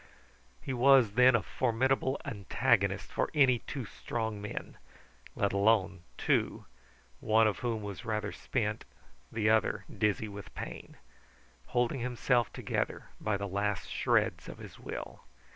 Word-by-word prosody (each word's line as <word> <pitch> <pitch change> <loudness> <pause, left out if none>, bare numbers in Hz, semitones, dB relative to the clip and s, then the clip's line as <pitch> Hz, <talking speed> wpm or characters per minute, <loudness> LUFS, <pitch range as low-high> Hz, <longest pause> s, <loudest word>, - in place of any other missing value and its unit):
He 135 - -3
was, 130 -3 +6
then, 125 +3 +6
a 115 - +1
formidable 130 +2 +1
antagonist 100 -3 +1
for - - 0
any 130 -5 +5
two 135 -1 -6
strong 110 0 -4
men; 105 - -6 0.6
let 100 -1 0
alone 100 -3 +2 0.2
two - - 0 0.5
one 110 +1 +4
of 110 - +1
whom 115 -3 -2
was 100 +2 -6
rather 105 -3 -2
spent, 110 -4 -2 0.5
the 110 -1 0
other 110 -1 +1
dizzy 105 +1 +1
with 100 -1 -10
pain, - - -7 0.7
holding 125 +2 0
himself 120 -1 +1
together - - -3
by 105 -2 0
the 100 +1 -4
last 100 0 -2
shreds - - +1
of - - -8
his - - -11
will. - - -7
110 Hz, 135 wpm, -31 LUFS, 105-125 Hz, 0.7 s, was